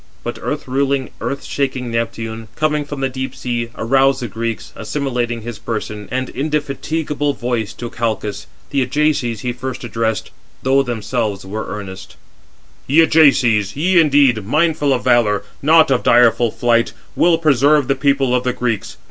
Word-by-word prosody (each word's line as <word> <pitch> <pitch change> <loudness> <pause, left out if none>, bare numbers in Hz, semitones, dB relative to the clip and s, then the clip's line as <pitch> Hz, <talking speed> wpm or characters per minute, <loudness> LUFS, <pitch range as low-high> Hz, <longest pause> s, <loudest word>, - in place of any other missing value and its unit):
But - - -5
earth - - -4
ruling, 135 0 0
earth 140 - -3
shaking 130 -3 -2
Neptune, 115 -1 -3
coming 150 -1 0
from 145 -1 -6
the 135 - +2
deep 130 0 -5
sea, 120 -2 -3
aroused 135 +3 +2
the - - -2
Greeks, 115 0 -4
assimilating 120 -5 -2
his 120 -2 -7
person 105 -2 -5
and 130 0 -2
indefatigable 145 +1 -2
voice 120 -4 -2
to 120 - -6
Calchas. 105 -3 -3 0.2
The 140 -1 +1
Ajaces 130 -4 0
he 125 -1 -2
first 130 +1 -6
addressed, 115 -2 -2 0.3
though 135 +1 +4
themselves 110 -4 -2
were 105 +3 -5
earnest: 95 -2 -8 0.7
"Ye 150 +5 +5
Ajaces, 125 -11 +4
ye 175 +5 +3
indeed, 140 -7 +3
mindful 150 +4 +1
of 130 -2 0
valour, 105 -4 +3 0.2
not 160 0 +5
of 125 - +2
direful 120 0 +4
flight, 115 +1 +1 0.2
will 170 -1 +4
preserve 145 -2 +3
the 135 - +3
people 135 -2 +1
of 125 0 +1
the 125 - 0
Greeks. 115 -5 -3
125 Hz, 155 wpm, -18 LUFS, 115-140 Hz, 0.7 s, Ye